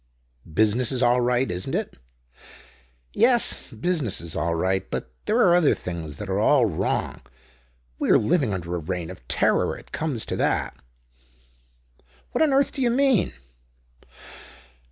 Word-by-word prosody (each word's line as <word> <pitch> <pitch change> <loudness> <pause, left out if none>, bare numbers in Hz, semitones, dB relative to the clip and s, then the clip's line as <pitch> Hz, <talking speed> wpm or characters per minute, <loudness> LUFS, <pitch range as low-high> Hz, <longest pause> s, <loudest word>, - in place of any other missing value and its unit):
"Business 110 - +2
is 130 -1 0
all 120 +1 +3
right, 125 0 +1
isn't 90 +1 -4
it?" - - -4 1.1
"Yes. - - +3
Business 135 - -1
is 85 -1 -6
all 85 0 -1
right. 95 +3 -1
But 65 - -5
there 215 - +1
are 185 -8 +5
other 175 -4 +4
things 80 -5 -6
that 105 - -6
are 95 +1 -1
all 125 +3 +4
wrong. 90 -8 -2 0.8
We - - -1
are - - +7
living 140 -2 +1
under 90 -2 -4
a 90 - -1
reign 90 +1 -4
of 65 -10 -14
terror. - - +1
It - - -16
comes 145 -8 -2
to - - -3
that." - - 0 1.6
"What - - -1
on 310 -2 +4
earth 275 +1 +2
do 270 - -5
you 245 - +3
mean?" 260 -3 +2
110 Hz, 155 wpm, -24 LUFS, -, 1.6 s, are